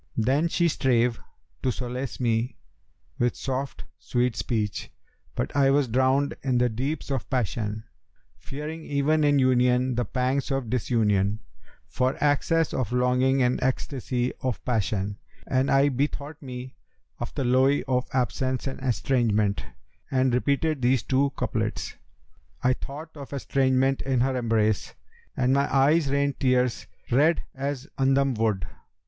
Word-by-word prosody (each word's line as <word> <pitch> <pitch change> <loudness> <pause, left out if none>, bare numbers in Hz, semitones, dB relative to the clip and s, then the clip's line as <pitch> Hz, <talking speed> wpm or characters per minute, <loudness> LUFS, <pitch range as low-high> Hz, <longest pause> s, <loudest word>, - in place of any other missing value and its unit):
Then 135 +8 +2
she 170 0 +2
strave 125 -6 +1 0.4
to 130 - +1
solace 125 +1 -4
me 115 0 0 0.6
with 120 0 +1
soft 130 -1 -4 0.2
sweet 125 -2 0
speech, 105 -4 -2 0.4
but - - -3
I 140 -1 +4
was 140 -1 +3
drowned 130 +4 +2
in 130 -2 +1
the 125 0 +3
deeps 135 +6 -3
of 135 -3 -2
passion, 110 -4 -2 0.6
fearing 155 +3 -6
even 150 +2 +1
in 145 -1 +4
union 125 -1 +3
the 120 0 -1
pangs 130 +5 -1
of 135 -5 -2
disunion, 105 -4 +1 0.4
for 130 +1 0
excess 155 +3 +2
of 125 -4 -2
longing 125 +2 +2
and 125 0 +1
ecstasy 130 -1 -1
of 130 -3 -3
passion; 105 -4 -1 0.3
and 130 0 +1
I 135 +1 +4
bethought 145 +3 -3
me 130 -1 -8 0.4
of 120 - -4
the 140 - -1
lowe 130 +3 +3
of 125 -1 0
absence 130 0 -1
and 135 - -4
estrangement 115 -5 +1 0.5
and 130 -1 +2
repeated 140 +3 +1
these 125 -1 +2
two 140 +1 +2
couplets, - - -2 0.7
'I 125 - +4
thought 155 +5 -8
of 140 -1 -9
estrangement 135 -1 +1
in 130 -2 0
her 130 +1 +1
embrace 110 -4 0 0.2
* - - -31
And 130 +1 +2
my 140 +1 +1
eyes 140 +2 +3
rained 140 0 0
tears 125 -2 +1 0.2
red 150 +7 +3
as 140 0 -4
'Andam 135 0 +3
wood. 110 -6 0
130 Hz, 140 wpm, -26 LUFS, 120-140 Hz, 0.7 s, I